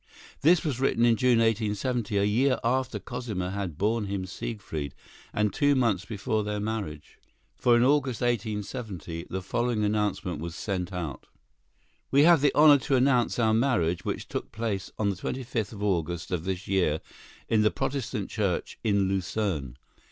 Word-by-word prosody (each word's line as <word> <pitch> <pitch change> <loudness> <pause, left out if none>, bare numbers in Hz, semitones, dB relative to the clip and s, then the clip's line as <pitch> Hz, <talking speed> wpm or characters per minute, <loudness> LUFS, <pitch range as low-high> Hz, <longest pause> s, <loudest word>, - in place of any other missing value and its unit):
This 170 +3 +4
was 135 -5 -1
written 125 -3 +2
in 115 -1 +5
June, 125 -1 +3
1870, 115 0 0
a 100 - +3
year 125 +5 +2
after 130 +2 0
Cosima 110 -8 -4
had 95 -6 -4
borne 110 +2 +1
him 100 -1 -3
Siegfried, 95 -7 -5 0.4
and 105 -1 0
two 145 -2 +3
months 110 -7 +1
before 110 +1 -2
their 105 0 -2
marriage. 100 -9 -5 0.4
For 120 -1 +4
in 120 - +4
August, 135 -3 +2
1870, 105 -7 -3
the 95 0 -4
following 120 +2 0
announcement 105 -5 -1
was 85 0 -5
sent 95 -3 -3
out: 85 -7 -5 0.8
"We 140 +2 +5
have 170 -2 +6
the 145 - +4
honor 150 -1 +7
to 135 +2 0
announce 125 -2 +3
our 110 -2 +3
marriage, 110 -9 +1
which - - -3
took - - -5
place 110 -4 -3
on 100 -2 +1
the - - -4
25th 115 +1 -3
of 105 -2 -7
August 85 -4 -1
of 90 -2 -2
this 95 +1 -3
year 90 -6 +1 0.5
in 110 -1 +3
the 105 - +4
Protestant 125 -7 -3
Church 100 -5 -2
in 100 -3 +2
Lucerne. 95 - -2
105 Hz, 165 wpm, -27 LUFS, 95-120 Hz, 0.8 s, honor